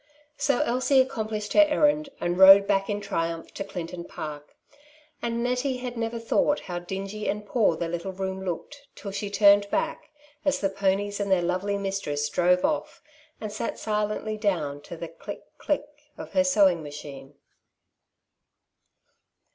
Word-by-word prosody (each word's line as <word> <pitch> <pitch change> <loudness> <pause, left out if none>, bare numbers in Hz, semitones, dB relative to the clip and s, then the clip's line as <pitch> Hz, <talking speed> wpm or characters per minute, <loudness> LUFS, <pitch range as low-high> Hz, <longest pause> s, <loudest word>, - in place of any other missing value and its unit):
So 280 -3 +1
Elsie 260 +2 +3
accom 220 -5 -4
plished 210 -1 -4
her 310 -1 +6
errand, 295 0 +3
and 175 0 -1
rode 195 +1 +10
back 195 -1 +1
in 205 0 -1
triumph 165 -5 -3
to 195 - -4
Clinton 180 -3 -6
Park; 150 -3 -8 0.7
and 235 0 -1
Nettie 250 +2 0
had 250 -1 -5
never 230 0 -2
thought 230 +5 +1
how 175 -2 -5
dingy 195 +4 -5
and 210 0 -3
poor 205 -5 +2
their 170 - -2
little 175 +3 -4
room 190 0 -4
looked, 280 - -6
till 200 - -7
she 200 +1 -4
turned 200 0 +5
back, 315 +2 -2 0.3
as 285 -1 +1
the 195 - +1
ponies 200 +1 0
and 200 -1 -1
their 180 -2 +3
lovely 185 +3 -1
mistress 195 -7 -2
drove 180 +3 +3
off, 300 0 -2 0.4
and 215 -1 -5
sat 225 +2 -3
silently 210 0 -2
down 165 -9 -1
to 165 - -9
the 170 - -5
click, - - -9 0.2
click 295 -1 0 0.3
of - - -8
her 280 - +3
sewing 200 -11 +4
machine. 145 -2 -9
200 Hz, 160 wpm, -26 LUFS, 180-235 Hz, 0.7 s, rode